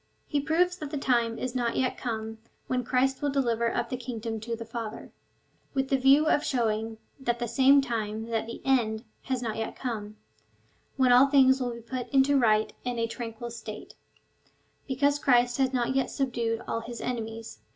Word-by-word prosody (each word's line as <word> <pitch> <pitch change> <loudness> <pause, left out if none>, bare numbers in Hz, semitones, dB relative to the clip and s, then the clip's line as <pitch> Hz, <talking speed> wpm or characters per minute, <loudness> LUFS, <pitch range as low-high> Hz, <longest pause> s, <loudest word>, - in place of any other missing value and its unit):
He 290 - 0
proves 355 +4 +1
that 300 -5 -6
tlie 290 - -3
time 235 -4 +1
is 255 -1 -3
not 240 -2 0
yet 255 -1 0
come 220 -2 -4 0.3
when 255 -1 -1
Christ 260 +2 +1
will 290 - +1
deliver 235 -4 +1
up 235 -1 -2
the 255 - -1
kingdom 230 -2 -5
to 230 +2 -4
the 230 0 -7
Father, 225 -1 -6 0.6
with 270 0 0
the 275 - +3
view 270 +3 +5
of 305 -1 +3
showing 225 -5 -1 0.3
at 240 0 +2
the 240 0 -2
same 270 +4 +5
time 220 -3 -3
that 225 -1 -1
the 230 - -8
end 235 -4 +1 0.2
has 260 -2 -2
not 220 -2 -3
yet 225 - -3
come, 215 -4 -5 0.8
when 260 -2 +4
all 250 +3 +7
things 265 -1 +5
will 245 -1 -1
be 235 - -9
put 245 +2 -5
into 275 0 +4
a - - +5
right 215 -3 +3
and 245 -1 -3
tranquil 235 0 -6
state, 220 -2 -8 0.9
because 285 +2 +1
Christ 245 -2 +3
has 265 -1 +3
not 250 0 0
yet 270 -1 +1
subdued 235 -4 -1
all - - -1
his 235 +1 -7
enemies. 225 -2 -5
245 Hz, 190 wpm, -28 LUFS, 230-265 Hz, 0.9 s, all